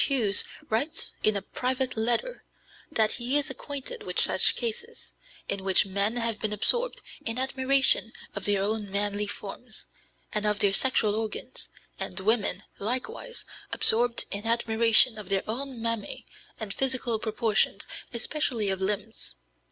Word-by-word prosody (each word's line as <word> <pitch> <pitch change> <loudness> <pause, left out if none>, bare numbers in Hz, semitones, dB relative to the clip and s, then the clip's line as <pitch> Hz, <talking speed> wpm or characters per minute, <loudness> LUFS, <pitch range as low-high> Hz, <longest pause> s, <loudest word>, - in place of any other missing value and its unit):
Hughes 230 -8 +6 0.2
writes 240 +8 -2
(in 215 -1 +2
a 195 - -5
private 255 +3 -3
letter) 235 - -1 0.5
that 220 -1 +2
he 250 +4 +1
is 290 -1 +1
acquainted 285 - -6
with - - -2
such - - +5
cases, 230 -3 -5 0.3
in 200 -1 -3
which 190 +1 +4
men 200 +4 -1
have 230 -2 -1
been 215 - -3
absorbed 480 - +3 0.2
in 225 +1 -2
admiration 265 -2 +2 0.2
of 200 - -6
their 200 -1 +1
own 210 0 -2
manly 205 +1 0
forms, 215 +3 -9 0.5
and 210 0 -1
of 210 -1 +1
their 200 -1 +1
sexual 220 -2 +2
organs, 220 0 -6 0.3
and - - -3
women, 215 +2 0 0.2
likewise, 260 - -3 0.3
absorbed 235 +1 +4
in 205 +3 -5
admiration 230 0 +5
of 200 -3 -9
their 195 -1 0
own 260 +3 -4
mammæ 230 -2 -3 0.3
and 215 -3 -5
physical 255 -4 0
proportions, 220 -1 -1 0.3
especially 235 -4 -1
of 190 0 -4
limbs. 210 - -3
225 Hz, 145 wpm, -26 LUFS, 205-255 Hz, 0.5 s, Hughes